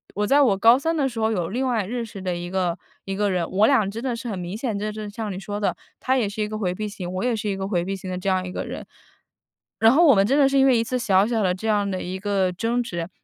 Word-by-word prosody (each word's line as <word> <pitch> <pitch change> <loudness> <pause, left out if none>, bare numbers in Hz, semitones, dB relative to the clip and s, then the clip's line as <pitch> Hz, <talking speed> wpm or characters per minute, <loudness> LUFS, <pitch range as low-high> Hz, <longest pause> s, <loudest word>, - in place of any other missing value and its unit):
我 210 +1 0
在 285 +4 +5
我 210 -8 +3
高 230 +4 +6
3 325 +4 -1
的 280 -3 +1
时 230 -2 -6
候 220 0 +1
有 175 -6 -1
另 255 +5 -1
外 225 -6 0
认 235 +3 -3
识 205 -3 -9
的 180 -2 -2
一 175 0 -5
个 180 -2 -1 0.3
一 195 - -3
个 205 +1 +1
人， 175 -2 -1
我 205 +3 +3
俩 220 -8 +3
真 225 +4 -6
的 255 -3 -1
是 230 +1 -7
很 200 - -3
明 180 +2 -5
显， 225 -4 -2
就 210 +1 -3
是 210 -1 -6
像 210 -1 -5
你 185 - -5
说 205 +1 -5
的， 205 - 0 0.2
他 260 +1 +1
也 225 -5 0
是 210 +2 -5
一 210 - 0
个 215 0 -5
回 180 -4 -1
避 215 +3 -4
型， 180 -3 -6
我 185 +4 -3
也 245 -2 +1
是 215 -1 -3
一 195 - -2
个 190 - -3
回 175 -4 0
避 195 +2 -3
型 185 -1 -8
的 180 - -3
这 185 +2 -2
样 185 -1 +1
一 180 - -6
个 - - -4
人。 - - -7 0.9
然 225 0 +6
后 325 +6 +5
我 280 - +7
们 195 -1 +3
真 275 +6 +2
的 280 - +6
是 275 0 +2
因 270 - +5
为 260 -2 +5
一 225 - +1
次 255 +2 -2
小 195 -4 +3
小 225 -1 0
的 185 -2 +2
这 190 +4 -6
样 205 -2 +1
的 185 -1 -3
一 185 +1 -5
个 195 -2 0
争 230 +7 -1
执， 170 -6 -5
205 Hz, 340 characters per minute, -23 LUFS, 190-235 Hz, 0.9 s, 我